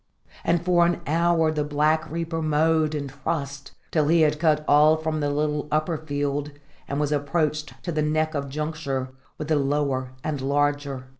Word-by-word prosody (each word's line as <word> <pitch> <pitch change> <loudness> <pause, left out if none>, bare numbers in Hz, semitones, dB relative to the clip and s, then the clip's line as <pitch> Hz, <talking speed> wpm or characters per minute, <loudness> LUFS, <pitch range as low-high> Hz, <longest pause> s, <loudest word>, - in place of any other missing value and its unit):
And 170 0 +1
for 175 -1 +4
an 170 0 +1
hour 165 +1 +2
the 150 -1 -1
Black 150 +2 +1
Reaper 165 0 -3
mowed 155 0 +2
and 145 -1 -3 0.2
trussed, 140 -4 -3 0.2
till 155 -3 +2
he 165 +1 +4
had 150 -1 +3
cut 155 -2 +2
all 150 +2 +6
from 160 0 -2
the 145 -1 0
little 150 0 -1
upper 155 +2 +1
field 145 -1 -2 0.4
and 140 - -2
was 150 -1 0
approached 155 +1 -1
to 175 - -3
the 155 -1 0
neck 155 +1 0
of 140 -2 -3
juncture 150 -3 -3 0.3
with 155 - -5
the 155 -1 +2
lower 135 -2 0
and 145 -3 -2
larger. 145 -1 0
150 Hz, 175 wpm, -25 LUFS, 145-160 Hz, 0.4 s, all